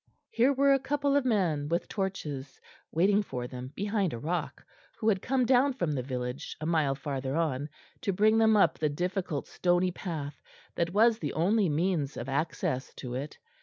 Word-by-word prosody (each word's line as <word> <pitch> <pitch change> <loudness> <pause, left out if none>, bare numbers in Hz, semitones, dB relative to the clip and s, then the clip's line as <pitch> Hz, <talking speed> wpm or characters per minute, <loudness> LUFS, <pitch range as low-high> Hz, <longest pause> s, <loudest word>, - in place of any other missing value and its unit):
Here 245 +4 +4
were 275 0 +4
a 275 - +3
couple 285 +1 0
of 285 -2 +2
men 170 - +1
with 170 +1 0
torches, 150 -9 -4 0.3
waiting 195 +5 +3
for 125 -11 -5
them 125 +1 -7
behind 200 -3 0
a - - -3
rock, 160 +5 -3 0.3
who 220 - -2
had 195 -3 +1
come 255 -1 +1
down 260 +2 +4
from 175 -11 -1
the 140 -3 -1
village, 125 +2 -5
a 155 - -4
mile 155 -4 +2
farther 135 -1 -3
on, 150 -3 -1 0.3
to 220 -7 0
bring 215 +4 +4
them 220 -1 +5
up 200 - +3
the 155 - +1
difficult 175 0 -2
stony 180 0 +1
path 155 -6 -5 0.3
that 170 0 0
was 225 +3 +4
the - - -3
only 190 +4 +2
means 155 -2 0
of 120 - -5
access 135 -2 -1
to 125 -3 -6
it. 140 +4 -5
170 Hz, 185 wpm, -29 LUFS, 145-210 Hz, 0.3 s, them